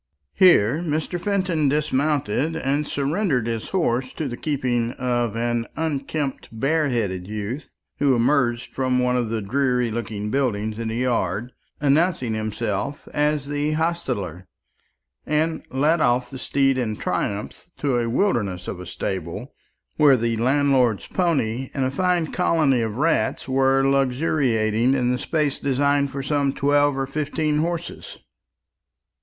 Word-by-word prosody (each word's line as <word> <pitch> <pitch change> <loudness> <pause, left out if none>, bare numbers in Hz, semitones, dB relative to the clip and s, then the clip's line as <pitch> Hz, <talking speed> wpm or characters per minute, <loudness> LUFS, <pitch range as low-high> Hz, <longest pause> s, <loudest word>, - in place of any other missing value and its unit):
Here 145 - +5
Mr. 165 +1 -2
Fenton 185 -7 +1
dismounted, 150 0 0
and 145 -1 -1
surrendered 145 - 0
his 115 -1 -3
horse 130 -9 0
to 155 - -3
the 120 - -4
keeping 125 -4 -1
of 120 -3 -1
an 120 0 -1
unkempt 145 -2 -3
bareheaded 115 - 0
youth 110 +7 -5 0.3
who 140 -2 +3
emerged 120 -1 +1
from 130 -1 0
one 125 0 +2
of 120 -3 0
the 110 -2 -2
dreary 125 +1 +1
looking 105 -2 -4
buildings 110 -5 -1
in 115 - -3
the 110 - -3
yard, 120 -2 -1 0.3
announced 150 +5 +2
himself 110 +2 -3
as 150 -1 +1
the 145 +1 -1
hostler, 125 - -2 0.8
and 155 +2 0
led 150 +5 +2
off 125 -1 +2
the 130 - -7
steed 135 0 +1
in 110 -4 -2
triumph 105 - -3
to 135 -4 0
a 115 -1 -1
wilderness 105 - 0
of - - -5
a 90 - -8
stable, 95 - -5 0.4
where 145 -4 +6
the 115 0 0
landlord's 130 -2 +2
pony 135 -8 0
and 135 -2 +1
a 130 - -1
fine 175 +1 0
colony 155 -8 +2
of 110 -2 -2
rats 160 0 +1
were 135 0 +3
luxuriating 130 -4 +2
in 125 -2 +1
the 125 - -1
space 150 0 -1
designed 140 +1 +1
for 135 0 -5
some 140 -1 +1
twelve 145 0 +2
or 135 - 0
fifteen 150 +2 -1
horses. 170 +1 -4
135 Hz, 140 wpm, -23 LUFS, 115-150 Hz, 0.8 s, where